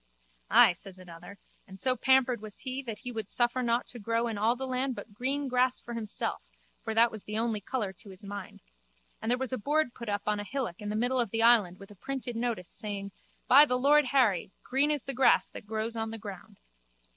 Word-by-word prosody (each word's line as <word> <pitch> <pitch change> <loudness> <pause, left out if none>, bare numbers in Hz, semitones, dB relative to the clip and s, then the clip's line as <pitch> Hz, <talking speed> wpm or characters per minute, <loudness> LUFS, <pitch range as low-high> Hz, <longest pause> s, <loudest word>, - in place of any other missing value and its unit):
Ay, - - +7
says 190 +1 -5
another, 180 +2 -12 0.3
and 190 0 -11
so 255 +3 +3
pampered 255 -2 +3
was 215 -2 -9
he 260 0 -4
that 230 -5 -6
he 250 - -4
would 220 -4 -4
suffer 240 +1 +2
nought 235 0 +1
to 245 - -9
grow 230 +2 0
in 225 - -3
all 220 +4 +2
the 265 +1 -5
land 255 0 -2
but 215 - -9
green 270 +6 -2
grass 255 0 +2
for 235 - -8
himself 220 -3 -2 0.4
(for 220 -1 -3
that 230 +1 +5
was 215 -2 -7
the 210 +1 -4
only 225 -2 -1
colour 210 -2 -3
to 205 +3 -14
his 190 +2 -9
mind) 200 -1 -8 0.6
and 225 - -3
there 245 - +3
was 260 0 -3
a 255 - -2
board 295 +2 0
put 235 -4 -7
up 205 0 -1
on 210 0 0
a - - -3
hillock 235 -5 -4
in 205 - -4
the 210 - -2
middle 245 +3 +1
of 235 - +1
the 225 +2 0
island 215 -7 +5
with 195 +1 -13
a - - -13
printed 255 +2 -5
notice, 230 -6 -2
saying: 200 -2 -5 0.4
By 280 +3 +9
the 250 -4 +1
Lord 290 +3 +4
Harry, 245 -10 +2
Green 275 +3 +1
is 295 -3 0
the 275 - -5
grass 260 0 +4
that - - -10
grows 220 +1 -3
on 225 0 -2
the 225 - -6
ground. 200 -4 -10
230 Hz, 235 wpm, -29 LUFS, 205-255 Hz, 0.6 s, By